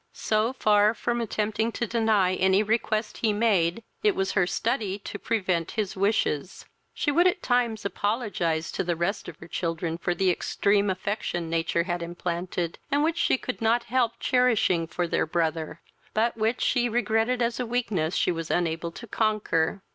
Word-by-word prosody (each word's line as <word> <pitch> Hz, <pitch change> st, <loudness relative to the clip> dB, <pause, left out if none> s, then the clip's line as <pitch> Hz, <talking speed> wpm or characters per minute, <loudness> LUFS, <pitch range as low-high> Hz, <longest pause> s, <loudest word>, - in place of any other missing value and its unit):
So 220 Hz, +3 st, 0 dB
far 210 Hz, -2 st, +3 dB
from 240 Hz, +2 st, -1 dB
attempting 220 Hz, 0 st, -1 dB
to 240 Hz, -, -1 dB
deny 220 Hz, -5 st, +2 dB
any 190 Hz, +2 st, +3 dB
request 215 Hz, 0 st, -1 dB
he 220 Hz, -, +1 dB
made, 205 Hz, -2 st, +1 dB, 0.2 s
it 420 Hz, -3 st, +3 dB
was 385 Hz, +1 st, 0 dB
her 185 Hz, -3 st, +2 dB
study 215 Hz, -2 st, -1 dB
to 205 Hz, 0 st, -7 dB
prevent 185 Hz, -7 st, 0 dB
his 210 Hz, -3 st, -1 dB
wishes. 195 Hz, -5 st, 0 dB, 0.3 s
She 290 Hz, -, -1 dB
would 345 Hz, +5 st, +4 dB
at 360 Hz, -, 0 dB
times 240 Hz, -4 st, +1 dB
apologize 200 Hz, -7 st, -1 dB
to -, -, -2 dB
the 175 Hz, -1 st, -1 dB
rest 170 Hz, +5 st, -2 dB
of -, -, -11 dB
her 165 Hz, -, -12 dB
children 165 Hz, -1 st, -3 dB
for 175 Hz, 0 st, -1 dB
the 185 Hz, +1 st, +3 dB
extreme 200 Hz, +3 st, +1 dB
affection 185 Hz, -3 st, -3 dB
nature 165 Hz, 0 st, +1 dB
had 175 Hz, -1 st, -3 dB
implanted, 175 Hz, 0 st, -3 dB
and 290 Hz, +1 st, +2 dB
which 330 Hz, +2 st, 0 dB
she 340 Hz, -, +3 dB
could 255 Hz, -1 st, -5 dB
not 230 Hz, +2 st, +2 dB
help 240 Hz, -3 st, +3 dB
cherishing 225 Hz, -9 st, +2 dB
for 175 Hz, +1 st, -2 dB
their 165 Hz, -, 0 dB
brother, 160 Hz, -1 st, -2 dB, 0.3 s
but 225 Hz, +2 st, +2 dB
which 225 Hz, +2 st, 0 dB
she 245 Hz, -2 st, +2 dB
regretted 225 Hz, +1 st, +1 dB
as 235 Hz, 0 st, 0 dB
a 250 Hz, -, -2 dB
weakness 200 Hz, -9 st, -1 dB
she -, -, +2 dB
was 165 Hz, -1 st, -4 dB
unable 170 Hz, -1 st, 0 dB
to 235 Hz, -, -9 dB
conquer. 205 Hz, -5 st, 0 dB
205 Hz, 175 wpm, -26 LUFS, 175-230 Hz, 0.3 s, would